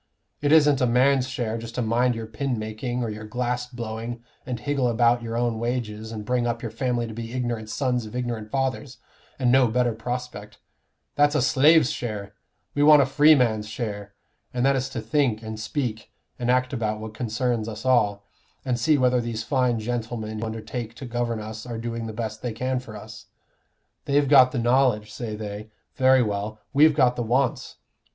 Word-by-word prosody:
It 145 0 +1
isn't 150 -4 +5
a 125 - +3
man's 130 +2 +3
share 115 -3 -3
just 115 0 -8
to 125 - 0
mind 120 +2 +2
your 115 0 -5
pin 125 +3 -3
making, 110 +3 -3
or 115 - -3
your 105 0 -7
glass 125 +2 -2
blowing, 115 -1 -6 0.2
and 125 -2 -3
higgle 140 -1 0
about 120 +1 +3
your 115 0 -4
own 120 -2 0
wages, 110 -2 -3
and 105 -2 -6
bring 125 +1 0
up 115 -1 -3
your 115 - -4
family 120 0 -1
to 115 - -7
be 115 +1 -6
ignorant 120 -4 -3
sons 125 -3 -1
of 105 - -10
ignorant 120 -4 -3
fathers, 135 +1 -2 0.4
and 125 -3 +2
no 130 -1 +5
better 120 +1 +1
prospect; 115 -2 -6 0.6
that's 145 +1 +3
a 150 - +3
slave's 145 +1 +5
share; 105 -4 -5 0.4
we 145 - 0
want 150 -1 +8
a - - 0
freeman's 125 -7 +4
share, 105 -2 -5 0.4
and 125 +1 0
that 140 0 +4
is 130 0 -1
to 115 - -5
think 125 -6 0
and 110 0 -6
speak 115 -1 -3 0.3
and 120 0 -1
act 125 +1 +2
about 110 -4 -1
what 110 0 -7
concerns 115 0 -1
us 110 +2 -8
all, 105 -6 +2 0.4
and 125 -2 0
see 150 +5 +3
whether 125 -2 +3
these 115 -1 -4
fine 125 -1 +1
gentlemen 110 -1 -4
who 115 - -3
undertake 110 +1 -6
to 125 - -8
govern 120 -1 -2
us 110 +1 -7
are 120 -2 -6
doing 115 0 -4
the - - -5
best 110 -1 -5
they 120 -3 -3
can 130 +3 -1
for 115 -4 -10
us. 110 +1 -11 0.8
They've 145 0 +2
got 130 -2 +7
the 130 - -3
knowledge, 120 -3 +2
say 115 -3 -5
they. 105 0 -7 0.2
Very 130 -1 +4
well, 105 0 -3
we've 150 +1 +5
got 125 -4 +3
the 120 - -2
wants. 125 +2 0
120 Hz, 195 wpm, -24 LUFS, 110-130 Hz, 0.8 s, want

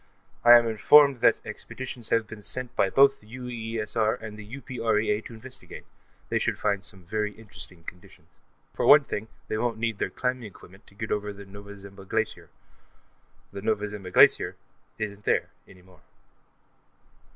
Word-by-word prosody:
I 120 0 +10
am 120 - +2
informed 135 +4 +6
that - - +6
expeditions 125 -3 -7
have 115 -1 +2
been 105 0 -10
sent 125 +4 -5
by 95 - +2
both 135 +4 +5
the 105 - -21
UEESR 115 -3 -2
and 110 -1 -8
the 110 +4 -9
UPREA 115 -4 0
to - - -9
investigate; 130 +3 -9 0.4
they - - +1
should - - -1
find 100 -2 0
some 95 -2 -6
very 105 +2 -2
interesting 95 -5 -9
conditions. 90 +2 -13 0.4
For - - -1
one 145 0 +9
thing, 110 -5 -5 0.2
they 110 - -2
won't 120 -1 -1
need 115 -2 -2
their - - -1
climbing 125 0 -2
equipment 95 -1 -14
to 100 - -17
get 110 +1 -5
over 105 0 -1
the 100 0 -11
Nova 100 +1 -11
Zembla 100 0 -12
Glacier; - - -2 1.0
the 100 - -6
Nova 105 0 0
Zembla 100 -3 -8
Glacier - - +5 0.4
isn't 105 -1 -5
there, - - +1 0.2
any 90 -1 -17
more. 90 -2 -21
110 Hz, 165 wpm, -26 LUFS, 100-120 Hz, 1.0 s, I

